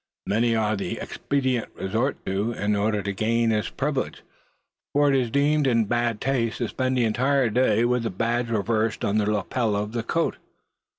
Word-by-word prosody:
Many 115 +3 +2
are 110 -1 +1
the 100 - -3
expedients 130 -4 -1
resorted 110 +8 -2
to, 100 +5 -1
in 105 -1 0
order 105 0 0
to 100 - -2
gain 115 +3 +1
this 105 -3 0
privilege; - - -3 0.7
for 145 -1 +4
it - - +3
is 125 -3 +1
deemed 145 +3 +2
in 115 -3 +3
bad 120 0 0
taste 120 -4 0
to 120 - -1
spend 130 0 -1
the 120 - +3
entire 125 +2 +2
day 115 -1 +3
with 125 0 +1
the 115 - -2
badge 115 +4 -1
reversed 110 0 0
on 105 +2 +1
the 105 0 +1
lapel 105 +2 0
of 105 +1 -2
the 115 0 -2
coat. 165 +8 -1
115 Hz, 185 wpm, -25 LUFS, 105-125 Hz, 0.7 s, for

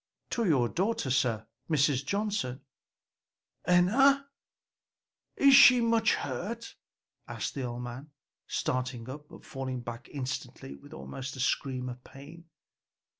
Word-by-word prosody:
"To 235 - 0
your 135 -9 +3
daughter, 185 - -1
sir, 115 -4 +1 0.2
Mrs. 145 -3 +2
Johnson." 200 -9 -2 1.1
"Enna! 270 +11 +4 1.1
is 275 -1 +6
she 250 -2 +9
much 230 -1 +3
hurt?" 205 - -5 0.5
asked - - -4
the 135 -3 -3
old 120 0 -5
man, 125 +5 -8 0.4
starting 125 -2 -2
up, 150 +3 -9
but - - -14
falling 130 -2 -5
back 115 0 -8
instantly 130 - -5
with 70 - -16
almost 100 - -7
a - - -9
scream 130 -1 -1
of 125 0 -8
pain. 155 +5 -13
135 Hz, 125 wpm, -29 LUFS, 125-200 Hz, 1.1 s, she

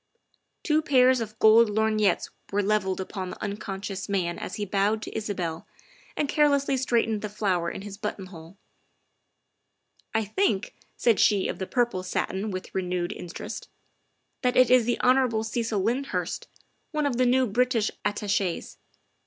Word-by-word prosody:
Two 310 -1 +2
pairs 260 -4 +4
of 215 -1 -6
gold 220 +1 +6
lorgnettes 215 -1 +1 0.2
were 205 +1 +1
levelled 195 -2 0
upon 190 0 -5
the - - -8
unconscious 200 -1 -5
man 180 -4 -1
as - - -5
he 205 - -3
bowed 200 +2 +1
to - - -8
Isabel 180 -7 -3 0.5
and 295 - +1
carelessly 280 -2 +3
straightened 230 -4 +1
the 210 - -4
flower 190 -5 0
in 195 - -7
his 205 0 -8
buttonhole. 185 -4 -7 0.8
" - - -42
I 220 -1 +2
think," 210 - 0 0.2
said 230 -4 +3
she 205 -3 +4
of - - -4
the 190 - -3
purple 240 -7 0
satin 190 +2 -2
with 185 -1 -6
renewed 180 0 -2
interest, 175 -4 -7 0.3
" - - -48
that 250 -1 +1
it 255 -1 +6
is 250 -2 +6
the 240 - 0
Hon. 250 -3 +3
Cecil 225 -2 -1
Lyndhurst, 250 +7 -2 0.4
one 305 -1 -1
of 265 -4 0
the 255 0 +3
new 260 +1 +4
British 240 0 +1
Attaches. 200 -3 -1
215 Hz, 155 wpm, -26 LUFS, 195-245 Hz, 0.8 s, gold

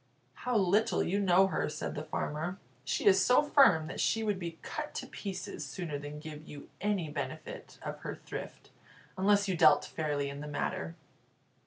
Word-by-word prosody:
"How 250 -2 -1
little 200 +2 +3
you 195 +3 0
know 190 -1 +5
her!" 190 - -1
said - - -4
the 150 - -4
farmer. 155 +3 -3 0.3
"She - - -1
is 190 -2 +6
so 250 +3 +5
firm 270 - +5
that 160 - -6
she 225 - +2
would 205 -3 0
be 170 -2 -5
cut - - -5
to - - -3
pieces 190 -6 -5
sooner 145 +1 -4
than 145 +1 -7
give 155 0 -9
you 145 -1 -10
any 200 -5 0
benefit 145 -1 -6
of - - -5
her - - -5
thrift, - - -8 0.4
unless 200 +1 +3
you 190 - +1
dealt - - +6
fairly 145 -3 -2
in 140 +1 -6
the 150 - -6
matter." 85 - -3
175 Hz, 180 wpm, -32 LUFS, 150-200 Hz, 0.4 s, is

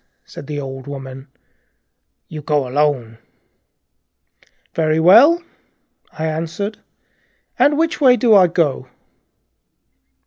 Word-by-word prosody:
said 140 - -12
the 150 -1 -5
old 135 -1 -8
woman, 135 -1 -9
softly. 135 - -42 0.5
" - - -55
You 155 -1 -8
go 145 -2 -1
alone." 130 -5 -1 1.5
"Very 155 0 0
well," 265 - +5 0.7
I 155 - -5
answered, 165 +7 -4
shortly, - - -36 0.8
"and 290 +1 +3
which 325 -1 -1
way 255 -3 +5
do 230 -1 +3
I 190 -3 +6
go?" 155 -6 -1
155 Hz, 115 wpm, -18 LUFS, 135-205 Hz, 1.5 s, I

